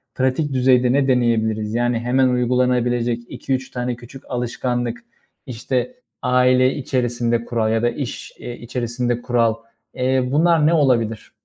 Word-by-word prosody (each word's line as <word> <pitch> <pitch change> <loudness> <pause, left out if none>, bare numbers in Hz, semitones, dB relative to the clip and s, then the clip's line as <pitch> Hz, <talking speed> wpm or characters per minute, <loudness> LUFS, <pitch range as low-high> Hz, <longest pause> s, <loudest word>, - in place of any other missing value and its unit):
pratik 130 +3 0
düzeyde 125 -1 +3
ne 140 0 +2
deneyebiliriz? 110 -4 +1
Yani, 120 0 +1
hemen 130 +2 +2
uygulanabilecek 125 -1 +1
2-3 130 -1 -3
tane 125 0 -3
küçük 125 +2 -13
alışkanlık, 120 -1 -2 0.5
işte, 130 - -3 0.3
aile 125 +1 +3
içerisinde 120 -3 -1
kural 115 -2 0
ya 115 - +1
da 120 - +3
iş, 135 0 -6
eee, 120 0 -7
içerisinde 120 0 -2
kural, 115 -2 +1 0.4
eee, 130 0 +1
bunlar 160 +1 +3
ne 165 - +3
olabilir? 120 -8 +1
125 Hz, 130 wpm, -20 LUFS, 120-130 Hz, 0.5 s, düzeyde